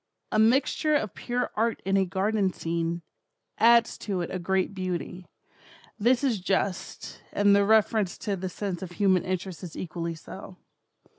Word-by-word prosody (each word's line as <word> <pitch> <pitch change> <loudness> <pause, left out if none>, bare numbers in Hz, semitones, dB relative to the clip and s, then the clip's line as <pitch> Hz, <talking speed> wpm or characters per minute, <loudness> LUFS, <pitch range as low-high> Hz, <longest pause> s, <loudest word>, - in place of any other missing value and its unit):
'A 215 - +2
mixture 270 +6 +3
of 215 -9 0
pure 245 +1 -2
art 230 +2 +1
in 195 0 +1
a 195 -1 +3
garden 195 +1 0
scene, 170 0 -2 0.6
adds 235 +1 +5
to 195 -4 -2
it 170 - -4
a 185 - -3
great 190 +2 0
beauty.' 185 -1 -4 0.7
This 240 +5 +3
is 245 -7 +1
just, 190 0 -2
and 205 0 +4
the 200 - +4
reference 215 -2 +3
to 205 -2 -2
the 185 0 -4
sense 190 -1 -4
of 180 -2 -7
human 190 -2 +3
interest 185 -2 -4
is 175 -4 -8
equally 170 -1 -4
so. 185 +3 -10
190 Hz, 160 wpm, -27 LUFS, 180-215 Hz, 0.7 s, adds